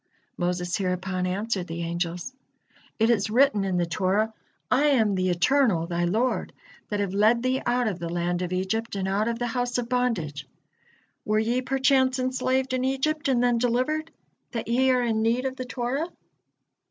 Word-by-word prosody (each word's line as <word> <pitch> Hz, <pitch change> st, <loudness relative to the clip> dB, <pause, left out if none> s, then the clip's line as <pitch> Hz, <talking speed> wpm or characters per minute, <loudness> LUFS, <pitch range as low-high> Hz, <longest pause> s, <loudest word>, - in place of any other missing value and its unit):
Moses 175 Hz, 0 st, -1 dB
hereupon 185 Hz, -1 st, -1 dB
answered 195 Hz, 0 st, -2 dB
the 165 Hz, +1 st, -4 dB
angels: 170 Hz, +6 st, -3 dB, 0.6 s
"It 225 Hz, +1 st, +3 dB
is 210 Hz, -2 st, +1 dB
written 245 Hz, -2 st, +3 dB
in 190 Hz, -2 st, 0 dB
the 175 Hz, -, +2 dB
Torah: 190 Hz, +6 st, 0 dB, 0.4 s
'I 255 Hz, -, +4 dB
am 225 Hz, -8 st, +3 dB
the 185 Hz, -1 st, 0 dB
Eternal, 180 Hz, -1 st, +2 dB
thy 175 Hz, 0 st, -1 dB
Lord, 225 Hz, +9 st, 0 dB, 0.4 s
that 205 Hz, -, -1 dB
have 200 Hz, -2 st, -1 dB
led 220 Hz, +4 st, +3 dB
thee 255 Hz, +1 st, +1 dB
out 245 Hz, 0 st, +2 dB
of 190 Hz, -5 st, -2 dB
the 170 Hz, -, -4 dB
land 175 Hz, +1 st, -1 dB
of 180 Hz, -1 st, -3 dB
Egypt 195 Hz, +5 st, -2 dB
and 190 Hz, -1 st, -2 dB
out 200 Hz, +3 st, 0 dB
of 235 Hz, 0 st, -1 dB
the 240 Hz, -, -2 dB
house 245 Hz, +1 st, -1 dB
of 240 Hz, -1 st, -3 dB
bondage.' 225 Hz, -, -1 dB, 0.8 s
Were 215 Hz, 0 st, +1 dB
ye 235 Hz, +4 st, +1 dB
perchance 260 Hz, 0 st, +2 dB
enslaved 255 Hz, 0 st, 0 dB
in 255 Hz, 0 st, 0 dB
Egypt 280 Hz, +3 st, 0 dB
and 250 Hz, -3 st, +2 dB
then 240 Hz, -1 st, +3 dB
delivered, 255 Hz, +7 st, 0 dB, 0.4 s
that 230 Hz, -, -3 dB
ye 255 Hz, +3 st, +3 dB
are 250 Hz, -1 st, +3 dB
in 225 Hz, -2 st, 0 dB
need 235 Hz, +3 st, +1 dB
of 260 Hz, 0 st, -2 dB
the 255 Hz, -1 st, -5 dB
Torah? 255 Hz, +5 st, -2 dB
230 Hz, 180 wpm, -26 LUFS, 185-255 Hz, 0.8 s, I